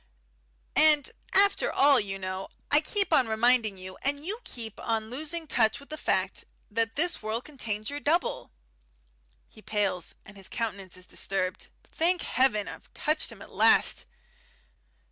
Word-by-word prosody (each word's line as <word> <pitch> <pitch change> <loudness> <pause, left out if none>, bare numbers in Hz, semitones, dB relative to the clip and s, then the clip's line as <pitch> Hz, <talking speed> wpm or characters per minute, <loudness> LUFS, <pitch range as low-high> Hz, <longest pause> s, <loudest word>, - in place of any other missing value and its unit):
"And, 305 -2 +6 0.2
after 400 +1 +4
all, 280 -2 +5
you 195 -2 -3
know 185 0 -5 0.2
I 295 +1 +6
keep 390 +2 +1
on 265 -6 +4
reminding 220 -2 +2
you, 185 0 -8
and 285 +2 0
you 420 +6 -2
keep 225 - -6
on 225 -1 -2
losing 315 +5 -3
touch 220 -7 +2
with 280 - -16
the 310 - -4
fact, 190 -8 -1 0.3
that 225 +1 0
this 345 +3 +1
world 220 +3 -3
contains 225 -6 -4
your 290 - -4
double." 320 +5 0 1.0
He 215 - -17
pales, 200 -5 -2
and 200 - -14
his 195 - 0
countenance 200 -6 -4
is 185 - -6
disturbed. 185 0 -3 0.2
Thank 350 +2 0
Heaven, 240 -6 +2
I've - - -10
touched 310 0 0
him - - -11
at - - -15
last! - - +3
230 Hz, 155 wpm, -28 LUFS, 205-300 Hz, 1.0 s, And